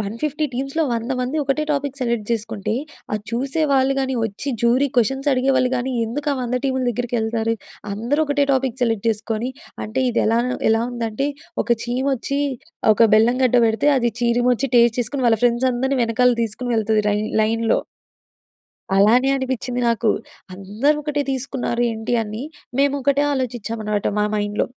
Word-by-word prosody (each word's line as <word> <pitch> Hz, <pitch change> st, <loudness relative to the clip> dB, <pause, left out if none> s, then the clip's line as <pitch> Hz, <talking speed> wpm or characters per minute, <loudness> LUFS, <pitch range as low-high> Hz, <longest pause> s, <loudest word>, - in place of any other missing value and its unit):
150 265 Hz, +9 st, -2 dB
టీమ్స్‌లో 275 Hz, +6 st, -1 dB
100 230 Hz, +2 st, -3 dB
మంది 255 Hz, +5 st, -2 dB
ఒకటే 275 Hz, +3 st, 0 dB
topic 280 Hz, -1 st, -3 dB
select 235 Hz, -4 st, -1 dB
చేసుకుంటే, 215 Hz, -2 st, -2 dB, 0.4 s
అది 210 Hz, -1 st, -2 dB
చూసే 270 Hz, +7 st, -1 dB
వాళ్ళు 265 Hz, 0 st, +3 dB
కాని, 265 Hz, -1 st, -1 dB
వచ్చి 225 Hz, +6 st, -5 dB
జ్యూరీ 255 Hz, +4 st, +3 dB
క్వెషన్స్ 270 Hz, +5 st, +1 dB
అడిగేవాళ్ళు 260 Hz, 0 st, +2 dB
కాని 250 Hz, +2 st, -2 dB, 0.2 s
ఎందుకు 285 Hz, +6 st, -3 dB
ఆహ్, 275 Hz, -, -2 dB
100 245 Hz, +1 st, -1 dB
టీముల 260 Hz, -1 st, 0 dB
దగ్గరికి 240 Hz, +1 st, -2 dB
వెళ్తారు? 225 Hz, 0 st, 0 dB, 0.4 s
అందరూ 235 Hz, +9 st, -1 dB
ఒకటే 285 Hz, 0 st, +2 dB
టాపిక్ 260 Hz, -2 st, -1 dB
సెలెక్ట్ 225 Hz, -2 st, 0 dB
చేసుకొని 225 Hz, +2 st, -2 dB, 0.3 s
అంటే 255 Hz, +5 st, -2 dB
ఇది 235 Hz, -, +1 dB
ఎలా 225 Hz, +1 st, +3 dB, 0.3 s
ఎలా 225 Hz, +1 st, +3 dB
ఉందంటే 235 Hz, +3 st, -2 dB, 0.4 s
ఒక -, -, -15 dB, 0.2 s
చీమచ్చి, 265 Hz, +2 st, -1 dB, 0.5 s
ఒక 230 Hz, -, +3 dB
బెల్లం 235 Hz, +3 st, +4 dB
గడ్డ 250 Hz, -1 st, +3 dB
వెడితే, 220 Hz, +5 st, +1 dB
అది 240 Hz, -2 st, +1 dB
చీరిమచ్చి 245 Hz, +2 st, +2 dB
టేస్ట్ 235 Hz, 0 st, +4 dB
చేసుకొని 255 Hz, +2 st, -2 dB
వాళ్ళ 225 Hz, -, +3 dB
ఫ్రెండ్స్ 245 Hz, +2 st, +3 dB
అందరిని 265 Hz, +2 st, 0 dB
వెనకాల 245 Hz, +2 st, +3 dB
తీసుకొని 235 Hz, +3 st, -3 dB
వెళ్తుంది 220 Hz, -1 st, +1 dB
లైన్ 210 Hz, +1 st, 0 dB, 0.2 s
లైన్‌లో. 225 Hz, +1 st, +1 dB, 1.2 s
అలానే 235 Hz, +7 st, +5 dB
అనిపించింది 255 Hz, -2 st, -2 dB
నాకు. 230 Hz, -1 st, +1 dB, 0.5 s
అందరూ 215 Hz, +10 st, 0 dB
ఒకటే 295 Hz, -1 st, -1 dB
తీసుకున్నారు 255 Hz, -2 st, -2 dB
ఏంటి 225 Hz, +2 st, -3 dB
అని. 215 Hz, +4 st, -6 dB, 0.3 s
మేము 280 Hz, 0 st, +3 dB
ఒకటే 280 Hz, +2 st, +2 dB
ఆలోచించామన్నమాట 225 Hz, -5 st, -2 dB
మా 210 Hz, -, +2 dB
మైండ్‌లో. 205 Hz, 0 st, 0 dB
245 Hz, 155 wpm, -21 LUFS, 225-265 Hz, 1.2 s, అలానే